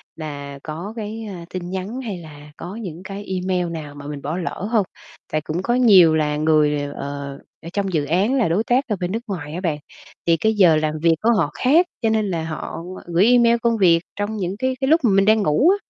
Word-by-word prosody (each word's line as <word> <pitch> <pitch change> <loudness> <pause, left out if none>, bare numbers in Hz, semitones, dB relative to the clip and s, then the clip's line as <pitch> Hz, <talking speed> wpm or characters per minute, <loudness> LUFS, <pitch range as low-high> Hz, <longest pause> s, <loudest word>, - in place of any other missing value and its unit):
là 145 -3 -7
có 170 +7 -6
cái, 220 0 -5
a, 175 -3 -8
tin 180 -1 -4
nhắn 190 +7 -4
hay 210 -7 -5
là 150 -3 -12
có 180 +4 -7
những 185 -6 -7
cái 200 +1 -7
email 185 -2 -1
nào 150 -3 -7
mà 145 0 -9
mình 145 -1 -6
bỏ 155 +5 -3
lỡ 185 +2 -4
hông. 215 -5 +3 0.5
Tại 155 - 0
cũng 155 +3 -3
có 240 - +1
nhiều 195 -10 +6
là 150 -1 0
người 150 -1 +3
đều, 145 0 -4
ờ, 140 -1 -6 0.2
ở 165 - -7
trong 195 -2 -1
dự 150 -3 +1
án 190 - +1
là 250 - +2
đối 195 +7 +1
tác 255 +3 +1
ở 215 - 0
bên 180 0 -2
nước 225 - -1
ngoài 160 -7 -5
á 180 - -4
bạn, 165 -5 -1 0.5
thì 165 -1 +4
cái 220 +7 +1
giờ 180 -6 +5
làm 155 0 0
việc 165 0 +4
của 225 - +2
họ 155 -6 +1
khác 315 - +4 0.2
cho 225 - +2
nên 215 -2 +1
là 165 -3 -2
họ 160 -1 -5 0.3
gửi 175 +3 +3
email 235 -1 +5
công 235 -1 +2
việc 170 -5 +5 0.2
trong 205 +2 -3
những 190 0 -3
cái 260 0 0
cái 265 - +1
lúc 320 +4 +4
mà 230 - +4
mình 195 0 +4
đang 220 +1 +4
ngủ 155 - +4
á, 390 - +5
180 Hz, 245 wpm, -21 LUFS, 155-220 Hz, 0.5 s, nhiều